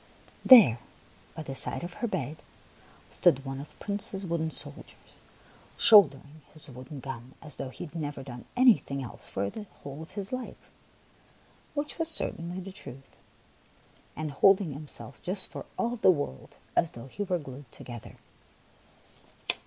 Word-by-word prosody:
There, 205 - +9 0.6
by 160 - -5
the 135 - -6
side 135 - +5
of 175 0 -6
her 240 - +1
bed, 160 - -3 0.7
stood 140 +1 +3
one 135 0 -4
of 145 - -10
the - - -15
Prince's 200 -1 -4
wooden 165 -2 -1
soldiers, - - -8 0.6
shouldering 155 - +6
his 155 - -5
wooden 130 +3 -9
gun 130 -1 -8
as 150 -3 -10
though 135 - -4
he 130 - -8
had 155 - -13
never 145 -4 -4
done 125 -2 -9
anything 215 - +4
else 120 - -10
for 100 +1 -2
the - - -7 0.2
whole 140 +2 -7
of 160 - -11
his 200 -1 -5
life, 255 -1 -5 0.6
— - - -26
which 295 +2 -3
was 330 - +2
certainly 175 - +1
the 190 +1 -7
truth, 135 -6 -11 0.5
— - - -31
and 155 -1 -3
holding 190 +2 +4
himself 140 -4 -10
just 185 +1 -2
for - - -8
all 240 +1 -1
the 220 - +5
world 145 - -1 0.2
as 170 - +3
though 115 - -9
he 135 +10 -8
were 185 -3 0
glued 135 -4 -10
together. 120 -2 -10
155 Hz, 160 wpm, -29 LUFS, 135-195 Hz, 0.7 s, There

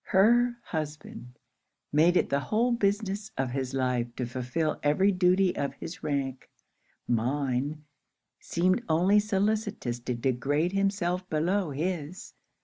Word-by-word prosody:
Her 240 +5 +4
husband 150 -6 -6 0.6
made 165 +4 +5
it - - +1
the 140 - +1
whole 225 - +1
business 205 -2 0
of 130 -2 -1
his 130 0 -3
life 125 -2 0
to 125 - -2
fulfill 130 +6 -2
every 170 +8 +3
duty 185 0 +3
of 140 - -2
his 180 +4 -8
rank, 135 -3 -3 0.6
mine 135 +4 -1 0.6
seemed 185 +5 +1
only 180 +6 +4
solicitous 205 - -1
to 120 +1 -3
degrade 135 +7 0
himself 195 -2 0
below 175 +4 0
his. 160 +3 -4
160 Hz, 125 wpm, -28 LUFS, 135-195 Hz, 0.6 s, made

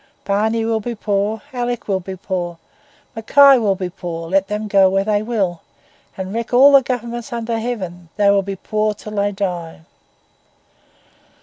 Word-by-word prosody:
Barney 220 +3 0
will 225 -1 0
be 235 +2 -5
poor, 210 +2 -1
Alick 245 -1 -3
will 195 -2 0
be 190 +1 -7
poor, 175 -2 -4 0.6
Mackay 270 +4 +6
will 205 -4 +1
be 185 -2 -4
poor; 170 -2 -6
let 195 0 +2
them 210 0 -3
go 195 -2 +5
where 195 +1 +1
they 205 0 +1
will, 205 -7 -2 0.6
and 190 +1 -5
wreck 230 +1 -2
all 275 +3 +8
the 275 -1 +7
governments 240 0 -4
under 230 -1 -2
heaven, 185 -8 -5
they 200 -1 +4
will 200 0 +3
be 195 0 -5
poor 215 +2 -1
until 210 0 -9
they 200 0 +1
die. 180 -5 -4
205 Hz, 170 wpm, -19 LUFS, 190-230 Hz, 0.6 s, all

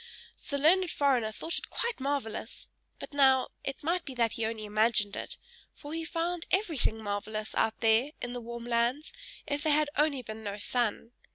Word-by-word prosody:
The 280 - 0
learned 350 +5 +4
foreigner 260 -8 +2
thought 325 +9 -1
it - - -10
quite 470 -6 -2
marvellous, 265 -5 -3 0.3
but - - -8
now 265 -2 +5
it 275 - -5
might 340 +3 +1
be 265 - -7
that 230 -2 +2
he 225 -1 -1
only 220 -1 -4
imagined 210 -1 +2
it - - -5 0.4
for 290 +1 -8
he 325 0 -3
found 340 +1 -2
everything 320 - +1
marvellous 215 +1 -3
out 220 0 +1
there, 225 +4 +4
in 245 0 -4
the 245 - -4
warm 235 0 -7
lands, 240 - 0 0.3
if 290 0 -1
there 305 0 +3
had 300 -1 +2
only 290 -4 +2
been 220 0 -7
no 200 -1 -4
sun. 230 +1 -1
250 Hz, 185 wpm, -30 LUFS, 220-300 Hz, 0.4 s, now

